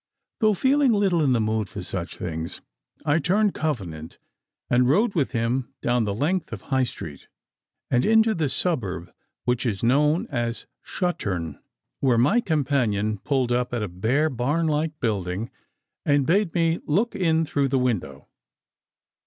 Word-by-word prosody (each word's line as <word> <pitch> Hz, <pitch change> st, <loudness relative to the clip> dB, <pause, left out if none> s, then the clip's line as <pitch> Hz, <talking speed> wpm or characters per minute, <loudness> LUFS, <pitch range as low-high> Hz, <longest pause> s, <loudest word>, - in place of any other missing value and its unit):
Though 215 Hz, -3 st, +3 dB
feeling 270 Hz, +3 st, +3 dB
little 195 Hz, -5 st, +2 dB
in 135 Hz, -3 st, +3 dB
the 120 Hz, -, +2 dB
mood 110 Hz, -2 st, 0 dB
for 100 Hz, -1 st, -6 dB
such 90 Hz, -1 st, -5 dB
things, 80 Hz, -1 st, -4 dB, 0.5 s
I 150 Hz, +2 st, +3 dB
turned 200 Hz, +6 st, +2 dB
Covenant 90 Hz, -, -4 dB, 0.5 s
and 125 Hz, +1 st, +3 dB
rode 200 Hz, -, +3 dB
with 150 Hz, -7 st, +1 dB
him 120 Hz, +1 st, -2 dB
down 120 Hz, -2 st, +2 dB
the 100 Hz, -, -1 dB
length 160 Hz, -, -1 dB
of -, -, -6 dB
High 130 Hz, -2 st, +1 dB
Street, 75 Hz, -10 st, -8 dB, 0.6 s
and 125 Hz, -1 st, +3 dB
into 220 Hz, 0 st, +4 dB
the 160 Hz, -6 st, 0 dB
suburb 95 Hz, -, -2 dB, 0.3 s
which 125 Hz, 0 st, 0 dB
is 110 Hz, -5 st, -2 dB
known 150 Hz, +7 st, +3 dB
as 120 Hz, -3 st, -2 dB, 0.2 s
Shuttern, 90 Hz, -, -3 dB, 0.4 s
where 130 Hz, -4 st, +3 dB
my 145 Hz, -, +4 dB
companion 125 Hz, -, 0 dB
pulled 130 Hz, +1 st, 0 dB
up 125 Hz, 0 st, 0 dB
at 115 Hz, -, -1 dB
a -, -, -2 dB
bare 120 Hz, -, 0 dB
barn 140 Hz, +7 st, 0 dB
like 155 Hz, 0 st, -1 dB
building, 100 Hz, -2 st, -2 dB, 0.5 s
and 145 Hz, -1 st, +2 dB
bade 185 Hz, +3 st, +2 dB
me 165 Hz, -1 st, +2 dB
look 205 Hz, +11 st, +1 dB
in 165 Hz, -3 st, +2 dB
through 140 Hz, -2 st, 0 dB
the 135 Hz, 0 st, +1 dB
window. 100 Hz, -, -2 dB
130 Hz, 155 wpm, -24 LUFS, 110-165 Hz, 0.6 s, into